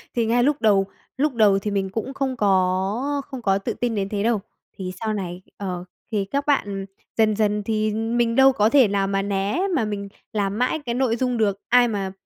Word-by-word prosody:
thì 235 Hz, -2 st, +2 dB
ngay 240 Hz, +2 st, +2 dB
lúc 290 Hz, +2 st, +1 dB
đầu 200 Hz, -3 st, +4 dB, 0.3 s
lúc 290 Hz, +1 st, +1 dB
đầu 210 Hz, -4 st, +4 dB
thì 210 Hz, +1 st, -3 dB
mình 195 Hz, -1 st, -1 dB
cũng 225 Hz, +7 st, -4 dB
không 270 Hz, -2 st, -2 dB
có 200 Hz, +7 st, +1 dB
không 265 Hz, -3 st, -7 dB
có 195 Hz, -3 st, +2 dB
tự 195 Hz, -, -3 dB
tin 240 Hz, -2 st, -2 dB
đến 195 Hz, -1 st, -1 dB
thế 205 Hz, -1 st, -2 dB
đâu, 225 Hz, -2 st, +1 dB, 0.3 s
thì 185 Hz, -2 st, -5 dB
sau 220 Hz, -1 st, -1 dB
này, 180 Hz, -3 st, -5 dB, 0.2 s
ờ, 180 Hz, -3 st, -4 dB, 0.3 s
thì 205 Hz, -3 st, 0 dB
các 280 Hz, +7 st, -2 dB
bạn 200 Hz, -9 st, 0 dB, 0.3 s
dần 215 Hz, -1 st, +3 dB
dần 210 Hz, -1 st, +1 dB
thì 215 Hz, 0 st, 0 dB
mình 230 Hz, +1 st, 0 dB
đâu 270 Hz, +1 st, +7 dB
có 215 Hz, -2 st, +3 dB
thể 265 Hz, -2 st, +6 dB
nào 200 Hz, -1 st, 0 dB
mà 195 Hz, 0 st, 0 dB
né, 200 Hz, -, -1 dB
mà 230 Hz, -, +1 dB
mình 200 Hz, -1 st, -4 dB, 0.2 s
làm 200 Hz, -1 st, -1 dB
mãi 250 Hz, +5 st, +1 dB
cái 235 Hz, -, -2 dB
nội 250 Hz, -3 st, +1 dB
dung 250 Hz, 0 st, -1 dB
được, 205 Hz, -3 st, +1 dB
ai 245 Hz, 0 st, +6 dB
mà 200 Hz, -4 st, -2 dB
215 Hz, 220 wpm, -23 LUFS, 195-240 Hz, 0.3 s, đâu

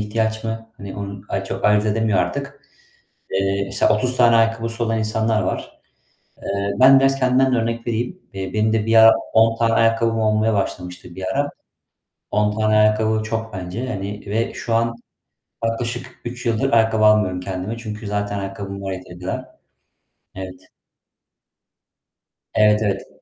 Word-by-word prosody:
ihtiyaç 110 Hz, +1 st, -1 dB
mı, 115 Hz, 0 st, -5 dB
hani, 100 Hz, -1 st, -8 dB
onu 100 Hz, -1 st, -6 dB
ay 95 Hz, 0 st, -2 dB
çok 95 Hz, 0 st, -5 dB
ayırt 105 Hz, 0 st, +4 dB
edemiyor 110 Hz, -2 st, +1 dB
artık. 140 Hz, +10 st, -3 dB, 0.7 s
Eee, 95 Hz, +1 st, 0 dB
mesela 100 Hz, -, +2 dB
30 125 Hz, +3 st, -1 dB
tane 120 Hz, -2 st, +5 dB
ayakkabısı 115 Hz, 0 st, +1 dB
olan 115 Hz, -1 st, 0 dB
insanlar 110 Hz, 0 st, 0 dB
var. -, -, -4 dB, 0.6 s
Eee, 100 Hz, 0 st, -2 dB
ben 135 Hz, +1 st, +8 dB
biraz 135 Hz, 0 st, +2 dB
kendimden 130 Hz, 0 st, +3 dB
de -, -, +3 dB
örnek 115 Hz, +1 st, -2 dB
vereyim. 120 Hz, +11 st, -2 dB
Eee, 95 Hz, -1 st, -5 dB
benim 110 Hz, +1 st, +1 dB
de 110 Hz, -1 st, +1 dB
bir 115 Hz, 0 st, +2 dB
ara 110 Hz, 0 st, +9 dB, 0.2 s
10 115 Hz, 0 st, +4 dB
tane 115 Hz, -1 st, +2 dB
ayakkabım 115 Hz, 0 st, +2 dB
olmaya 110 Hz, 0 st, +2 dB
başlamıştı 90 Hz, -3 st, -4 dB
bir 95 Hz, -, -5 dB
ara. 145 Hz, 0 st, 0 dB, 0.8 s
10 105 Hz, 0 st, +2 dB
tane 110 Hz, 0 st, +2 dB
ayakkabı 110 Hz, 0 st, +3 dB
çok 110 Hz, 0 st, -4 dB
bence, 95 Hz, +6 st, -5 dB
hani, 100 Hz, -2 st, -5 dB
ve 110 Hz, +3 st, -1 dB
şu 115 Hz, -, -4 dB
an 115 Hz, 0 st, +1 dB, 0.7 s
yaklaşık 120 Hz, +2 st, -3 dB
3 120 Hz, +1 st, -6 dB
yıldır 115 Hz, +4 st, +1 dB
ayakkabı 110 Hz, -1 st, +3 dB
almıyorum 105 Hz, -4 st, +4 dB
kendime. 95 Hz, +4 st, -4 dB
Çünkü 110 Hz, -2 st, -7 dB
zaten 105 Hz, 0 st, -2 dB
ayakkabım 100 Hz, 0 st, -6 dB
var 95 Hz, -, -3 dB
yeteri 90 Hz, -1 st, -9 dB
kadar. 90 Hz, +1 st, -4 dB, 0.9 s
Evet. 95 Hz, -1 st, -9 dB, 1.9 s
Evet, 105 Hz, 0 st, +4 dB
evet. 100 Hz, -2 st, -2 dB
110 Hz, 155 wpm, -21 LUFS, 100-115 Hz, 1.9 s, ara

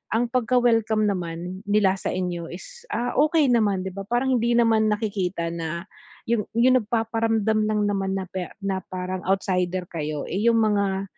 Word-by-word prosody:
ang 240 Hz, +2 st, +2 dB
pagka 255 Hz, 0 st, +1 dB
welcome 225 Hz, -2 st, +2 dB
naman 180 Hz, -1 st, -4 dB
nila 205 Hz, -2 st, +3 dB
sa -, -, -4 dB
inyo 175 Hz, -2 st, -3 dB
is, 480 Hz, -, -10 dB
ah, 245 Hz, +1 st, -1 dB
okey 305 Hz, 0 st, +4 dB
naman 205 Hz, -5 st, +2 dB
'di 190 Hz, -, -4 dB
ba 195 Hz, -, -5 dB
parang 250 Hz, +3 st, +1 dB
hindi 235 Hz, +1 st, +1 dB
naman 225 Hz, -2 st, +3 dB
nakikita 195 Hz, -5 st, -1 dB
na 165 Hz, 0 st, -4 dB, 0.4 s
'yung 230 Hz, -2 st, +1 dB
'yung 255 Hz, +2 st, +5 dB
nagpaparamdam 225 Hz, -1 st, 0 dB
lang 210 Hz, -1 st, +1 dB
naman 195 Hz, -1 st, -1 dB
na 195 Hz, -, -2 dB
pa 185 Hz, -2 st, -3 dB, 0.2 s
na 195 Hz, -1 st, -1 dB
parang 185 Hz, 0 st, -3 dB
outsider 185 Hz, -1 st, 0 dB
kayo, 150 Hz, -3 st, -3 dB
eh, 190 Hz, -, -2 dB
yung 230 Hz, -1 st, +4 dB
mga, 195 Hz, -1 st, 0 dB
205 Hz, 170 wpm, -24 LUFS, 185-230 Hz, 0.4 s, yung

